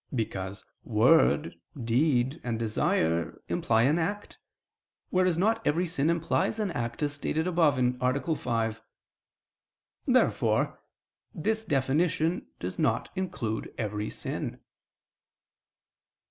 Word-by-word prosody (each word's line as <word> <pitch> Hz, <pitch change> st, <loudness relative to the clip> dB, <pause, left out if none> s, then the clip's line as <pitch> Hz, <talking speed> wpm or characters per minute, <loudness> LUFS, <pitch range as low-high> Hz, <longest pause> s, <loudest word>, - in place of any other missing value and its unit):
Because 100 Hz, -4 st, -3 dB, 0.2 s
"word," 130 Hz, +7 st, +3 dB, 0.2 s
"deed," 130 Hz, +4 st, +1 dB
and 120 Hz, -2 st, -2 dB
"desire" 85 Hz, -7 st, 0 dB
imply 115 Hz, 0 st, +2 dB
an 150 Hz, +7 st, +3 dB
act; 205 Hz, +5 st, -3 dB, 0.7 s
whereas 185 Hz, -2 st, +2 dB
not 220 Hz, +5 st, +2 dB
every 170 Hz, +5 st, +1 dB
sin 160 Hz, -3 st, 0 dB
implies 170 Hz, +5 st, +1 dB
an 205 Hz, -4 st, 0 dB
act, 120 Hz, -1 st, -3 dB
as 145 Hz, 0 st, 0 dB
stated 155 Hz, +2 st, -1 dB
above 165 Hz, -6 st, +3 dB
(A. 125 Hz, +5 st, +1 dB
5). 115 Hz, -4 st, -2 dB, 1.3 s
Therefore -, -, +2 dB, 0.6 s
this 220 Hz, +7 st, -1 dB
definition 155 Hz, +3 st, +1 dB
does -, -, -5 dB
not -, -, +1 dB
include 140 Hz, -, -3 dB
every 105 Hz, -1 st, -2 dB
sin. -, -, -4 dB
145 Hz, 105 wpm, -28 LUFS, 115-170 Hz, 1.3 s, word